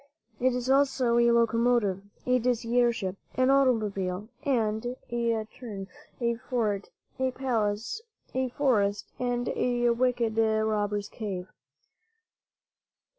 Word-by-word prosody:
It 255 Hz, 0 st, +2 dB
is 250 Hz, 0 st, -2 dB
also 265 Hz, -3 st, +3 dB
a 235 Hz, 0 st, +5 dB
locomotive, 230 Hz, -4 st, +3 dB, 0.2 s
a 250 Hz, 0 st, +3 dB
dizzy 240 Hz, 0 st, +1 dB
air 240 Hz, -1 st, +5 dB
ship, 195 Hz, -4 st, -4 dB, 0.2 s
an 255 Hz, +1 st, +4 dB
automobile, 210 Hz, -7 st, +1 dB
and, 240 Hz, -3 st, 0 dB
in 230 Hz, -2 st, 0 dB
turn, 205 Hz, -6 st, -7 dB, 0.3 s
a 235 Hz, -1 st, 0 dB
fort, 220 Hz, -5 st, -1 dB, 0.3 s
a 260 Hz, 0 st, +2 dB
palace, 240 Hz, -, -1 dB, 0.3 s
a 260 Hz, 0 st, 0 dB
forest 210 Hz, -7 st, +1 dB
and 245 Hz, -1 st, -1 dB
a 240 Hz, -1 st, +1 dB
wicked 235 Hz, -2 st, +1 dB
robber's 215 Hz, -2 st, +1 dB
cave. 190 Hz, -5 st, -5 dB
235 Hz, 115 wpm, -28 LUFS, 215-250 Hz, 0.3 s, a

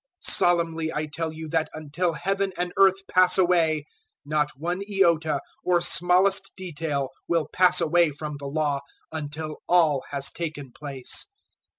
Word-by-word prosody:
005:018 -, -, +4 dB
Solemnly 165 Hz, -2 st, +1 dB
I 155 Hz, +1 st, -1 dB
tell 160 Hz, +1 st, -4 dB
you 160 Hz, 0 st, -7 dB
that 160 Hz, 0 st, 0 dB
until 155 Hz, +3 st, -2 dB
Heaven 195 Hz, +4 st, -1 dB
and 180 Hz, 0 st, -2 dB
earth 195 Hz, 0 st, +4 dB
pass 185 Hz, 0 st, +4 dB
away, 165 Hz, -5 st, +3 dB, 0.4 s
not 150 Hz, 0 st, +1 dB
one 175 Hz, +5 st, -2 dB
iota 165 Hz, -6 st, +2 dB, 0.2 s
or 180 Hz, -1 st, +3 dB
smallest 185 Hz, +3 st, +2 dB
detail 155 Hz, -6 st, -3 dB, 0.2 s
will 165 Hz, -3 st, +1 dB
pass 180 Hz, 0 st, +4 dB
away 170 Hz, 0 st, +3 dB
from 150 Hz, 0 st, -6 dB
the 140 Hz, 0 st, -7 dB
Law 145 Hz, -1 st, 0 dB, 0.3 s
until 155 Hz, 0 st, -5 dB
all 160 Hz, -6 st, +4 dB
has 140 Hz, -1 st, -2 dB
taken 155 Hz, -6 st, -5 dB
place. 135 Hz, -2 st, -6 dB
160 Hz, 150 wpm, -25 LUFS, 150-180 Hz, 0.4 s, 005:018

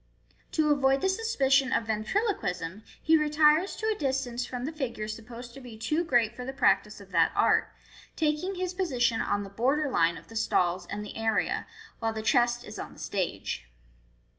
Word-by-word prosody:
To 310 Hz, -2 st, +3 dB
avoid 270 Hz, -1 st, +3 dB
the 380 Hz, -, +2 dB
suspicion 275 Hz, -11 st, +2 dB
of 230 Hz, -, +1 dB
ventrilo 225 Hz, -, 0 dB
quism, 180 Hz, -, -4 dB, 0.2 s
he 320 Hz, -, +5 dB
retires 305 Hz, +3 st, +4 dB
to 440 Hz, -, -5 dB
a 440 Hz, -, +2 dB
distance 260 Hz, -, -2 dB
from 250 Hz, -1 st, -4 dB
the 300 Hz, -, -3 dB
figure 240 Hz, -8 st, -4 dB
supposed 235 Hz, +2 st, -8 dB
to 275 Hz, -, -11 dB
be 240 Hz, -3 st, -10 dB
too 305 Hz, +9 st, 0 dB
great 240 Hz, -7 st, +2 dB
for 250 Hz, -, -6 dB
the 265 Hz, +2 st, -5 dB
practice 230 Hz, -6 st, +2 dB
of 200 Hz, -1 st, -14 dB
that 170 Hz, -2 st, +4 dB
art, -, -, +3 dB, 0.4 s
taking 320 Hz, +5 st, 0 dB
his 365 Hz, 0 st, -2 dB
position 250 Hz, -11 st, +1 dB
on 205 Hz, -, 0 dB
the 195 Hz, -, -8 dB
border 270 Hz, +7 st, +1 dB
line 165 Hz, -4 st, +2 dB
of 160 Hz, -, -14 dB
the 225 Hz, -, -12 dB
stalls 180 Hz, -4 st, +1 dB
and 210 Hz, +1 st, -5 dB
the -, -, -9 dB
area, 225 Hz, -1 st, 0 dB, 0.3 s
while 225 Hz, 0 st, -1 dB
the 220 Hz, 0 st, -4 dB
chest 240 Hz, +2 st, +2 dB
is 210 Hz, -, -8 dB
on -, -, -7 dB
the -, -, -15 dB
stage. 100 Hz, -, -3 dB
245 Hz, 190 wpm, -28 LUFS, 215-300 Hz, 0.4 s, he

